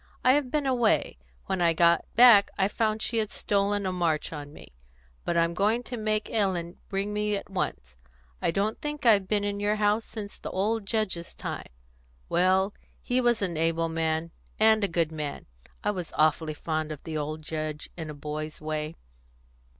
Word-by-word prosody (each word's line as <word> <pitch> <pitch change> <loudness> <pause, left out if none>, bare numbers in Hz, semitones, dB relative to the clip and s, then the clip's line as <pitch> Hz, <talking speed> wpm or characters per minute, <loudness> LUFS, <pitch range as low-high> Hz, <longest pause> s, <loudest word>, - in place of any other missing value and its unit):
I 255 - +6
have 285 -2 +1
been 295 +1 0
away; 240 - +2 0.3
when 190 - -1
I 170 -1 +4
got 170 0 +4
back 230 -4 +8
I 190 -1 +3
found 215 +1 0
she 230 - 0
had 215 -2 -1
stolen 200 0 0
a 185 - 0
march 170 -4 0
on 145 -1 -7
me. - - -14 0.5
But 170 - 0
I'm 170 0 +2
going 215 +6 +1
to 245 - -6
make 215 -1 -1
Ellen 185 -6 -1
bring 200 +1 -1
me 210 0 0
at 200 - -6
once. 65 - -3 0.4
I - - +2
don't 200 +5 -1
think 295 -2 -4
I've 205 -5 +5
been 205 0 +1
in 205 0 -2
your 205 +1 +1
house 210 +1 +2
since 210 -3 -8
the - - -6
old 210 +2 -1
Judge's 200 -6 -2
time. - - -5 0.6
Well, 190 +3 +3 0.3
he 250 +1 +1
was 240 -3 +2
an 175 -4 -1
able 165 +1 +1
man, 160 0 -1 0.3
and 220 0 +5
a - - +3
good 165 -3 0
man; 150 -2 -5 0.4
I 210 - +2
was 180 -4 -5
awfully 155 0 +2
fond 155 0 -2
of 150 - -7
the 160 - -5
old 155 +1 -3
Judge, 155 -1 -4
in 160 -3 -6
a 150 - -6
boy's 155 +1 -5
way." 155 +1 -3
190 Hz, 190 wpm, -27 LUFS, 160-215 Hz, 0.6 s, back